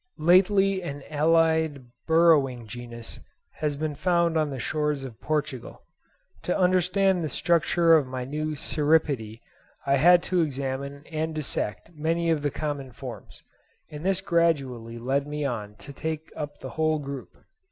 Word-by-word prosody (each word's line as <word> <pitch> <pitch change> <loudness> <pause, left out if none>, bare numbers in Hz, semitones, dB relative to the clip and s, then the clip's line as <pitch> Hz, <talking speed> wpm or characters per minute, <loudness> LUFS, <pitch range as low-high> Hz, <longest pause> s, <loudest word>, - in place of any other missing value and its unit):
Lately 190 +4 +4
an 145 -5 -6
allied 160 -2 +2 0.2
burrowing 155 -7 +4
genus 120 0 -8 0.4
has 150 -2 -1
been 155 +1 -2
found 170 +1 +1
on 155 -2 +1
the 135 - -5
shores 150 +1 -1
of 125 -5 -9
Portugal. 150 -5 -3 0.6
To 180 - -1
understand 185 0 +2
the 155 - -2
structure 170 0 +3
of 150 -5 +4
my 130 -1 -4
new 155 +3 -3
Cirripede 145 -7 0 0.4
I 140 0 +3
had 175 +5 +6
to 180 -1 +1
examine 140 0 -3
and 160 0 -2
dissect 150 -2 -3
many 165 +2 0
of 155 -2 +1
the 145 - 0
common 145 -2 -4
forms; - - -10 0.5
and 150 +1 -7
this 190 0 +1
gradually 135 -10 0
led 135 +4 -1
me 150 0 -3
on 105 -6 -4
to 140 +6 -11
take 160 +2 -5
up 145 -1 -5
the - - -6
whole 155 0 +1
group. 140 -3 -7
150 Hz, 150 wpm, -26 LUFS, 135-165 Hz, 0.6 s, had